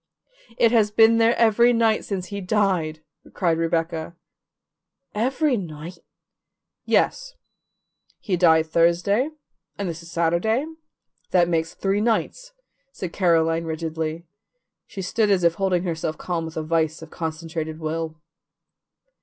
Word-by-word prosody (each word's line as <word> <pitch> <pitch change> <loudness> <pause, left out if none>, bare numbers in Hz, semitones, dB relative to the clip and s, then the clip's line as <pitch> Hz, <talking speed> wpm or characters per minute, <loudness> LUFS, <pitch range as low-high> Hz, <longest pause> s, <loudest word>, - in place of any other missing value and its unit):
"It 230 - +4
has 220 -3 +3
been 225 +2 +5
there 230 +1 +4
every 235 +1 +4
night 225 -2 +2
since 185 -3 -4
he 200 - -4
died," 180 -6 0 0.3
cried 170 -4 +1
Rebecca. 165 0 -2 1.0
"Every 260 +5 +1
night?" 170 -1 -7 0.9
"Yes. - - +1 0.8
He 195 - -2
died 160 -2 +4
Thursday 170 - +2 0.5
and 200 - -3
this 165 -1 -5
is 170 - -13
Saturday; 170 - +1 0.6
that 175 -2 +3
makes 165 -1 -1
three 195 +1 0
nights," 240 - -1 0.4
said 185 -9 -6
Caroline 165 -2 +2
rigidly. 160 0 -4 0.6
She 190 - -7
stood 210 +4 +1
as 190 -3 +2
if 170 -1 +4
holding 185 -1 0
herself 160 -3 -3
calm 170 -2 -3
with 160 0 -8
a 160 - -2
vise 160 0 -1
of 160 - -12
concentrated 160 -1 -5
will. 160 0 -4
175 Hz, 130 wpm, -23 LUFS, 160-210 Hz, 1.0 s, been